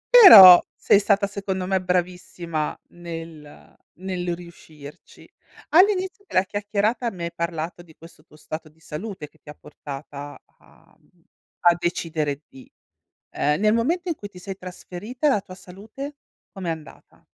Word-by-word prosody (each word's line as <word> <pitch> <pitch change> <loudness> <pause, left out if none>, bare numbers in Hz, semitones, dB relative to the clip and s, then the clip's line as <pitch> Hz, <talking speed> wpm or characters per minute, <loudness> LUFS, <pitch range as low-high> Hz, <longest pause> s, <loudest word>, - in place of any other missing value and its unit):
Però, 195 - +11
sei 200 - +3
stata 200 0 +2
secondo 195 -2 -4
me 190 0 0
bravissima 180 -3 -3
nel 165 -3 -11 0.2
nel 180 -1 -4
riuscirci. 160 -4 -15 0.4
All'inizio 380 +2 +2
della 185 - +1
chiacchierata, 210 +4 -2
mi 180 -4 -8
hai 170 - -5
parlato 170 0 -4
di 160 -3 -19
questo 165 -2 -17
tuo 155 - -22
stato 155 +1 -8
di 155 +1 -29
salute 165 +1 -8
che - - -30
ti 150 - -16
ha 150 - -10
portata 145 -1 -10 0.2
a, - - -25
uhm, - - -33 0.4
a 175 -1 +5
decidere 155 -4 -3
di 130 - -17 0.6
ehm, 150 +3 -1
nel 215 0 +3
momento 330 +11 0
in - - -1
cui 205 - -10
ti 190 -3 -15
sei 190 +1 -8
trasferita, 195 - -5
la 240 -8 +2
tua 185 - -13
salute 210 +10 -10 0.4
com'è 190 -4 -7
andata? 160 -3 -11
180 Hz, 150 wpm, -23 LUFS, 165-205 Hz, 0.6 s, Però